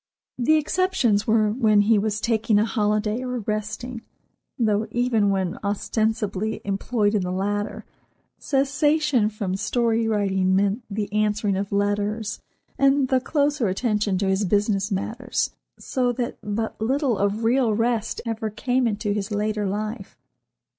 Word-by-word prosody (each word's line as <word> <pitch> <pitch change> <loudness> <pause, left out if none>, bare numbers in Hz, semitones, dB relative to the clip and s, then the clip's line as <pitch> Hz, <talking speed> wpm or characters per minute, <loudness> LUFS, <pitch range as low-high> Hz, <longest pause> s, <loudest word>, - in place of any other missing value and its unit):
The 280 +6 +4
exceptions 305 - +1
were 215 -1 +3
when 215 -3 +3
he 210 +1 +4
was 215 +1 -1
taking 220 -2 +1
a 210 - +3
holiday 215 0 0
or 250 -1 -3
resting, 215 +3 -4 0.6
though 215 -3 +1
even 235 -4 +1
when 190 -3 -1
ostensibly 215 0 -1
employed 205 +2 0
in 210 - +2
the 180 0 -3
latter, 205 +2 -2 0.5
cessation 280 -3 +2
from 200 -3 -3
story 230 +2 +1
writing 195 -3 +1
meant 200 +4 +1
the 205 -1 -4
answering 210 -1 +1
of 195 +1 -3
letters 205 +2 -1 0.4
and 275 -1 +3
the 260 - +3
closer 290 -3 +1
attention 210 0 0
to 195 +1 0
his 190 +2 +1
business 205 +1 +1
matters, 230 +5 -2 0.3
so 250 -2 -1
that 240 0 -4
but 215 +1 -3
little 265 +2 +1
of 200 +3 0
real 235 -1 +2
rest 225 0 0
ever 225 -1 -2
came 245 +4 0
into 210 -1 -1
his 205 0 -3
later 210 0 -1
life. 215 +4 -4
215 Hz, 140 wpm, -24 LUFS, 205-240 Hz, 0.6 s, The